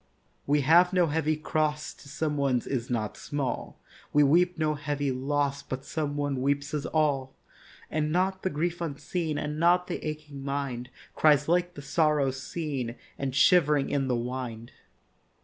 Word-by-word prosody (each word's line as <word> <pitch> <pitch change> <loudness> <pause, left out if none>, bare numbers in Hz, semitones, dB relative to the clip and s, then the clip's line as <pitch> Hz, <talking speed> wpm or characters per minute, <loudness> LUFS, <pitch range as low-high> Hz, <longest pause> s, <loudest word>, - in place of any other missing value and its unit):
We 145 +1 +3
have 175 +6 +5
no 180 -2 +4
heavy 155 0 0
cross 155 -1 -1
To 140 - -15
some 155 0 -2
one's 135 -4 +1
is 125 -3 -3
not 110 -4 -2
small; 140 -4 -4 0.3
We 150 - +5
weep 175 +5 +3
no 155 -1 +1
heavy 145 -2 -2
loss 140 +2 -1
But 130 +1 -6
some 145 -2 -2
one 145 -3 -1
weeps 140 +1 0
his 150 -1 -2
all; 140 -4 0 0.6
And 155 0 0
not 190 +2 +1
the 190 - 0
grief 170 +3 -2
unseen, 160 0 -2
And 150 +1 -3
not 175 +2 +4
the - - -5
aching 150 -2 -6
mind, 135 -3 -3 0.2
Cries 150 -2 +4
like 175 +1 +1
the 145 - -8
sorrow 150 -2 +2
seen 135 -2 -4 0.2
And 135 -1 -2
shivering 150 -3 +4
in 135 -2 +1
the 125 - +1
wind. 120 -1 -5
145 Hz, 165 wpm, -28 LUFS, 135-155 Hz, 0.6 s, have